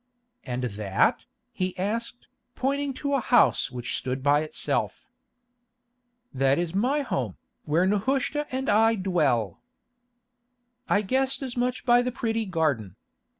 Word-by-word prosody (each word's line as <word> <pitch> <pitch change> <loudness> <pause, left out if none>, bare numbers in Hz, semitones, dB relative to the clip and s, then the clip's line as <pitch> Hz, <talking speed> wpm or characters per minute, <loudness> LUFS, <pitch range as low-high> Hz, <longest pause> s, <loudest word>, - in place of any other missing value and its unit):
"And 125 0 -4
that?" 100 -4 0 0.3
he 185 0 -3
asked, 230 +5 -3 0.3
pointing 280 +1 -1
to 280 +1 -2
a 275 - +3
house 240 - +3
which 125 -2 -4
stood 130 0 -3
by 145 +1 +4
itself. 155 - -2 1.3
"That 135 +1 +2
is 170 -1 -2
my 255 +9 +1
home, 130 - -3 0.3
where 160 +4 +2
Nehushta 270 +9 0
and 265 +1 -3
I 225 +2 +4
dwell." 155 - 0 1.3
"I 205 - +3
guessed 265 +5 0
as 255 -2 -5
much 250 +1 -1
by 240 -1 +5
the 250 +1 -2
pretty 225 -2 -2
garden." 145 - -1
200 Hz, 130 wpm, -26 LUFS, -, 1.3 s, by